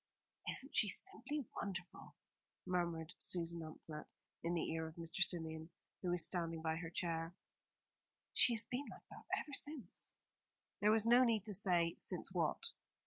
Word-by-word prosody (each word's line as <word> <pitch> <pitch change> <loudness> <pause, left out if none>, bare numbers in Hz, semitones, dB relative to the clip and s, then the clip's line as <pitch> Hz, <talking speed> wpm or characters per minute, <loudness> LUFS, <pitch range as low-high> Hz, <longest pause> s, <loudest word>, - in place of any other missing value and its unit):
"Isn't 275 +3 +1
she 210 - +6
simply 300 - -1
wonderful?" 185 -3 -5 0.5
murmured 170 -2 -1
Susan 170 -1 +1
Amphlett 155 -1 -7 0.4
in 170 +1 +1
the 165 - 0
ear 160 0 -1
of 160 - -9
Mr. 165 0 -3
Symeon, 160 -3 +2 0.3
who 180 - -1
was 175 -1 +4
standing 165 -3 -1
by 160 0 +1
her 165 -1 -4
chair. 165 0 -1 1.0
"She 240 - +6
has 225 -1 +2
been 260 +3 -3
like - - -11
that - - -10
ever 290 - -4
since." 280 - -3 0.7
There 210 - +5
was 220 0 +5
no 240 +2 +8
need 225 -4 +3
to 210 - -3
say 175 -4 +3
since - - -1
what. - - +1
175 Hz, 155 wpm, -40 LUFS, 165-220 Hz, 1.0 s, no